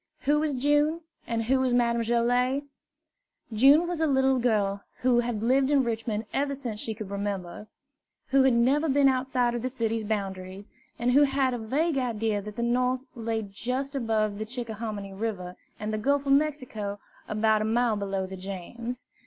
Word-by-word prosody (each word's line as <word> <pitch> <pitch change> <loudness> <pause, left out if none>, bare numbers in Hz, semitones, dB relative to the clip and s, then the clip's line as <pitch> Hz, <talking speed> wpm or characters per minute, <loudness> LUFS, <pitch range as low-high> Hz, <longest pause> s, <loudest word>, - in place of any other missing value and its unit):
Who 295 +1 +2
was 300 -2 0
June? 295 +5 +2 0.3
and 230 -1 -1
who 260 +4 +2
was 255 -2 +2
Madame 235 -1 +2
Joilet? 245 +4 +1 0.9
June 275 +9 +6
was 345 -2 -3
a 320 - +3
little 265 -2 +3
girl 205 -5 +1 0.2
who 245 -1 +4
had 235 -3 -2
lived 265 +3 +3
in 285 -2 +4
Richmond 225 -2 -2
ever 280 0 0
since 240 -6 -5
she 220 0 -2
could 210 -3 -7
remember, 200 -1 -4 0.6
who 275 0 +4
had 265 -2 +4
never 275 +7 +3
been 280 0 +4
outside 255 -2 +1
of 240 - -2
the 255 - -2
city's 230 -3 -2
boundaries, 195 -2 -4 0.3
and 240 +1 +1
who 280 +3 +6
had 270 -2 +2
a 245 - -3
vague 275 +7 0
idea 225 -4 -1
that 210 +1 -8
the 235 - -2
North 250 +2 +1
lay 225 -2 -2
just 250 +8 -3
above 215 -5 0
the 215 - -3
Chick 240 0 -5
ahominy 210 -3 -5
River 190 -4 -4 0.2
and 215 +1 -3
the 215 - -1
Gulf 280 +5 +1
of 275 - +3
Mexico 255 -9 -1 0.3
about 215 0 +2
a - - 0
mile 230 0 +2
below 195 -2 -2
the 190 0 -8
James. 200 +7 -6
235 Hz, 185 wpm, -27 LUFS, 215-265 Hz, 0.9 s, June